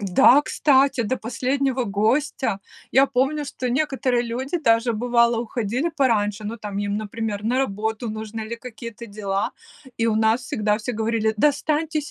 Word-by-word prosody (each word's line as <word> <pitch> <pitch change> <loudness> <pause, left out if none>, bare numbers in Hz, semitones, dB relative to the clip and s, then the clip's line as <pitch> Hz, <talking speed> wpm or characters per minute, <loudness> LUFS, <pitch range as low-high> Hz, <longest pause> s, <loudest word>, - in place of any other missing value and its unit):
Да, 245 +8 +5
кстати, 275 -4 +3
до 250 +4 -1
последнего 260 +2 -1
гостя. 220 +3 0 0.3
Я 270 +2 +5
помню, 275 +4 0
что 265 -3 -4
некоторые 260 -2 +1
люди 260 +8 -3
даже, 230 -4 +2
бывало, 235 +1 +2
уходили 235 +5 -2
пораньше, 215 -6 +1
ну, 220 +3 -4
там 205 -2 -6
им, 205 0 -1
например, 215 -1 -4
на 245 +4 +1
работу 220 -1 -2
нужно 220 +1 -6
или 220 +2 -5
какие-то 235 -1 -9
дела, 200 -1 -2 0.4
и 230 - +1
у 220 - +2
нас 220 +2 +3
всегда 210 -3 0
все 240 +3 -4
говорили: 220 0 0
"Да 295 - +5
останьтесь 305 +1 -1
235 Hz, 160 wpm, -23 LUFS, 215-265 Hz, 0.4 s, Да